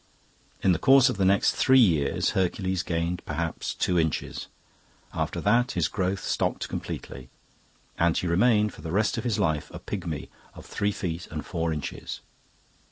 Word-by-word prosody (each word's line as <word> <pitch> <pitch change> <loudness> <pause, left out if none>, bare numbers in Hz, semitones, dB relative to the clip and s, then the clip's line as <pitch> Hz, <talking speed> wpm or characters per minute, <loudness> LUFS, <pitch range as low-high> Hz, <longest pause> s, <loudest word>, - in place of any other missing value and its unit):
In 95 - +5
the 85 - +1
course 135 -1 +6
of 125 - -3
the 95 - +2
next 100 +1 +4
three 130 0 +4
years 85 - +3
Hercules 95 0 0
gained 85 0 -2
perhaps - - -3
two 90 -1 +1
inches. 80 -2 -2 0.7
After - - -2
that 120 +4 +2
his 85 -4 +1
growth 95 0 -2
stopped - - -1
completely, 65 0 -6 0.7
and 85 -1 +3
he - - -1
remained 105 +4 +3
for - - -12
the 80 - -6
rest 105 +6 +1
of - - -5
his 120 -5 0
life 75 -1 0
a - - -7
pigmy 85 -7 -5 0.3
of - - -11
three 105 0 -1
feet 90 -4 -4
and 75 -1 -5
four 85 -2 -2
inches. 75 -3 -5
90 Hz, 165 wpm, -26 LUFS, 85-105 Hz, 0.7 s, course